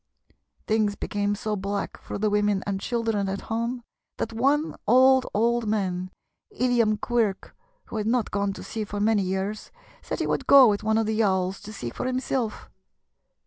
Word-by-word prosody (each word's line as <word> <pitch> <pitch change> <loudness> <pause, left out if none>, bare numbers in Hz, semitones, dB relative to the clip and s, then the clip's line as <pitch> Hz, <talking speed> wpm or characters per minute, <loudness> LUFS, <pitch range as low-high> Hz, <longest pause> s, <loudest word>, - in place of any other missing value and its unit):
Things 215 -2 +1
became 205 0 -1
so 210 +1 -2
black 200 0 -3
for - - -7
the 210 +1 0
women 205 -1 +1
and 195 -1 -2
children 225 -4 -1
at 195 +1 -3
home 235 +2 -2 0.3
that 225 - -3
one 280 +7 +1
old, 260 +3 +5
old 235 +1 +1
man, 185 -4 -1 0.4
Illiam 235 -3 +1
Quirk, 225 -5 -1 0.3
who - - -6
had 215 0 -2
not 235 -1 +1
gone 200 0 0
to - - -9
sea 220 - -4
for 205 0 -5
many 210 0 +3
years, 190 +3 -3 0.3
said - - -4
he - - 0
would - - -2
go 275 -2 +9
with 205 -2 +1
one 220 +1 +2
of 225 - +2
the 220 - -1
yawls 190 -3 +1
to 210 +1 -9
see 120 - -6
for - - -4
himself. 255 -3 -2
215 Hz, 180 wpm, -25 LUFS, 200-235 Hz, 0.4 s, go